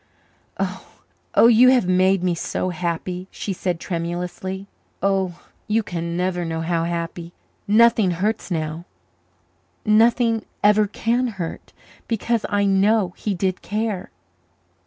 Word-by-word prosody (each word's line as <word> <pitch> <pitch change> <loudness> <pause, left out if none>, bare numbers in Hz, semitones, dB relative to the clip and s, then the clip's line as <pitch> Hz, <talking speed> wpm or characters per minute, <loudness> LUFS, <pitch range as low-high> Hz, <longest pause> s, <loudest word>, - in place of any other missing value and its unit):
"Oh, - - +8
you 240 +2 +7
have 250 -8 +3
made 185 0 +3
me 180 -1 +2
so 170 +2 -2
happy!" 180 +1 -3
she 200 - -4
said 180 -2 -2
tremulously. 180 +2 -4 0.4
"Oh, 190 -3 0 0.2
you 220 +1 +1
can 170 -2 -4
never 180 -1 -1
know 165 -1 -3
how 165 0 0
happy! 170 0 -4 0.3
Nothing 220 -1 +5
hurts 185 +2 -1
now 160 -1 -3 1.0
nothing 225 +1 +3 0.2
ever 210 0 +5
can 235 +4 0
hurt, 170 -3 -6 0.4
because 230 0 -1
I 205 -1 +1
know 195 -1 +3
he 205 -3 -2
did 185 +1 -1
care." 210 -3 -3
190 Hz, 120 wpm, -22 LUFS, 175-215 Hz, 1.0 s, Oh